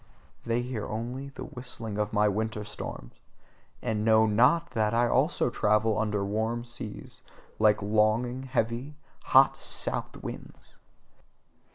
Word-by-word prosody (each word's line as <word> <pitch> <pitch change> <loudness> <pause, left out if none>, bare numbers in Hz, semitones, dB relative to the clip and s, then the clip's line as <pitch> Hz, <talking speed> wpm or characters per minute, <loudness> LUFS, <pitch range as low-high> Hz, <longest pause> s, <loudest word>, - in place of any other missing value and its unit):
They 115 +1 0
hear 120 -4 -4
only 125 +5 -5
the 140 - -9
whistling 115 -4 -6
of 105 +1 -1
my 105 -1 +3
winter 105 +1 -2
storms: - - -8 0.7
and 105 -1 -1
know 110 0 +5
NOT 125 +11 +3
that 110 -2 0
I 120 +1 +3
also 130 0 +1
travel 105 0 +2
over 105 -2 -1
warm 110 +3 -2
seas, 120 -3 -6 0.4
like 105 -1 +3
longing, 110 +4 +1
heavy, 130 +2 -2 0.3
hot - - +5
south - - +1
winds. - - -10
110 Hz, 130 wpm, -28 LUFS, 105-120 Hz, 0.7 s, know